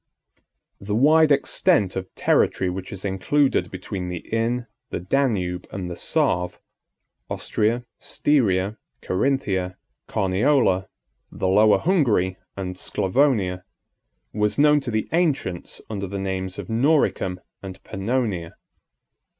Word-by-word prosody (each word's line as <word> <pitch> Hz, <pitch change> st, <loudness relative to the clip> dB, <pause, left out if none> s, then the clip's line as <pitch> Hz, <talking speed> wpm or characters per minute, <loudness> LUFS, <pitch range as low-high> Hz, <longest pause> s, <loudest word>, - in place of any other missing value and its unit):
The 105 Hz, +1 st, -3 dB
wide 155 Hz, +5 st, +5 dB
extent 140 Hz, -, +2 dB
of 95 Hz, -1 st, -5 dB
territory 90 Hz, -, +2 dB
which 95 Hz, 0 st, -6 dB
is 95 Hz, 0 st, -7 dB
included 130 Hz, +9 st, +1 dB
between 95 Hz, -1 st, -5 dB
the 90 Hz, -1 st, -6 dB
Inn, 120 Hz, +2 st, 0 dB, 0.2 s
the -, -, -3 dB
Danube, 90 Hz, -4 st, 0 dB
and 90 Hz, -2 st, -5 dB
the -, -, -5 dB
Save,—Austria, 105 Hz, +6 st, -2 dB
Styria, 105 Hz, -8 st, +1 dB, 0.2 s
Carinthia, 95 Hz, -5 st, 0 dB, 0.3 s
Carniola, 95 Hz, 0 st, +2 dB, 0.4 s
the 95 Hz, -, -2 dB
Lower 105 Hz, +3 st, +5 dB
Hungary, 120 Hz, -, +2 dB, 0.2 s
and 90 Hz, -1 st, -4 dB
Sclavonia,—was 100 Hz, -2 st, -1 dB
known 150 Hz, 0 st, +5 dB
to 135 Hz, -3 st, -5 dB
the 110 Hz, -2 st, -1 dB
ancients 150 Hz, -, -1 dB
under 100 Hz, -3 st, -4 dB
the 100 Hz, +2 st, -5 dB
names 95 Hz, -1 st, -3 dB
of -, -, -6 dB
Noricum 115 Hz, -, +1 dB, 0.2 s
and 95 Hz, -1 st, -8 dB
Pannonia. 100 Hz, -4 st, -2 dB
100 Hz, 110 wpm, -23 LUFS, 95-130 Hz, 0.4 s, wide